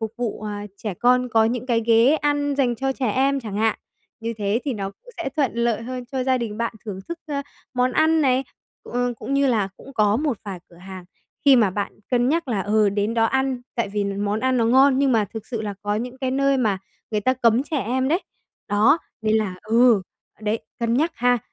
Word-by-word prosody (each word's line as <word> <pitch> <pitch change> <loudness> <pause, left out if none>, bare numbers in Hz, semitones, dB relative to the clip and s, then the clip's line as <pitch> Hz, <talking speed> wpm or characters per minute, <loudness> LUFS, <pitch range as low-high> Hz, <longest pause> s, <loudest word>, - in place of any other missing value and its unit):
phục 220 -1 -3
vụ, 235 -3 -3
à, 205 -1 -5
trẻ 210 -2 -4
con 250 +5 +3
có 225 -1 +4
những 240 +2 -1
cái 235 -3 +2
ghế 230 +5 +5
ăn 290 -1 0
dành 250 -4 +2
cho 270 +3 -1
trẻ 255 -5 -1
em 275 +3 +1
chẳng 210 -4 -6
hạn. 220 0 +1 0.4
Như 230 +1 -3
thế 205 +3 0
thì 280 - -1
nó 195 -4 -4
cũng - - -18
sẽ 340 -5 -3
thuận 280 -4 +1
lợi 235 -1 0
hơn 250 +1 -5
cho 260 -1 -1
gia 260 -1 +2
đình 220 -3 -4
bạn 235 -1 -2
thưởng 205 -4 -5
thức, 340 0 -5
ơ, 280 -2 -2 0.3
món 250 0 +2
ăn 320 +3 +3
này. 265 -2 +2 0.4
Cũng 245 0 -2
cũng 270 - -4
như 280 0 +3
là, 215 -6 +1
cũng 275 - -13
có 210 -3 +3
một 280 -4 -1
vài 195 -3 -5
cửa 170 - -19
hàng 185 0 -10 0.4
khi 275 -2 +7
mà 215 -5 +4
bạn 200 +2 -3 0.2
cân 245 0 +2
nhắc 325 -1 0
là, 210 -5 0
ừ, 210 +1 +3
đến 205 +3 -1
đó 225 -1 +3
ăn, 265 +1 0
tại 235 -4 -1
vì 205 0 -1
món 200 +2 -1
ăn 260 0 +1
nó 230 - +2
ngon, 265 +3 +5
nhưng 275 -2 +3
mà 220 -2 +3
thực 220 - -6
sự 230 -3 -4
là 205 -1 -4
có 205 0 -1
những 245 +4 -4
cái 260 -2 -1
nơi 275 +1 +2
mà 215 -6 +1 0.3
người 215 - 0
ta 255 +5 +2
cấm 240 0 +3
trẻ 300 - -4
em 260 +3 0
đấy. 335 +5 +2 0.5
Đó, 215 +10 +4 0.2
nên 220 0 +2
là 205 -4 -1
ừ, 230 -2 +4 0.4
đấy, 215 +1 0 0.2
cân 230 0 +1
nhắc 315 +6 +1
ha, 245 0 +2
235 Hz, 235 wpm, -23 LUFS, 215-265 Hz, 0.5 s, khi